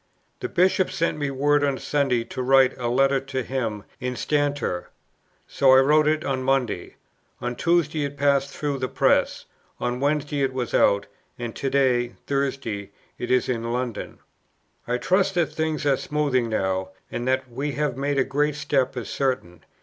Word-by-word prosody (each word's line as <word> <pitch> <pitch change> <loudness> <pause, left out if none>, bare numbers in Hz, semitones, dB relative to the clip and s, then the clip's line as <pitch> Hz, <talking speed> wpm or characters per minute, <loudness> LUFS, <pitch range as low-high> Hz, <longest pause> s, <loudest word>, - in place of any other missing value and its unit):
"The - - -4
Bishop 185 +1 +2
sent 165 -2 -1
me 145 -1 -1
word 145 +2 +2
on 140 -2 +1
Sunday 135 -5 0
to 130 - -6
write 135 0 +4
a 120 - -1
Letter 135 +3 +3
to 135 -1 -4
him 115 -6 -3 0.2
'instanter.' 140 -5 -1 0.6
So 135 -1 +4
I - - +8
wrote 150 +2 +4
it 155 0 +1
on 130 -1 -1
Monday: 130 -8 -1 0.4
on 120 0 -3
Tuesday 160 -2 +1
it 140 0 -6
passed 140 -1 +2
through 140 -1 -3
the 130 - -1
press: - - +1 0.3
on 125 0 -2
Wednesday 145 +1 0
it 135 -1 +1
was 125 -2 -3
out: 100 0 +3 0.3
and 120 -2 -5
to 135 - -2
day 125 -3 +2
[Thursday] 135 -8 -2 0.3
it 120 - -4
is 130 - +2
in 115 -2 -2
London. 125 -2 -3 0.7
"I 120 +1 0
trust 190 +6 +1
that 170 -3 +1
things 160 -1 -2
are 140 -2 +3
smoothing 140 -6 0
now; 95 -3 -1 0.2
and 120 - -3
that 130 0 +1
we 140 +4 -3
have 145 -3 -1
made 140 +1 -1
a 135 - +4
great 145 +2 0
step 140 -3 0
is 120 - -4
certain. 125 - -2
135 Hz, 175 wpm, -24 LUFS, 125-145 Hz, 0.7 s, I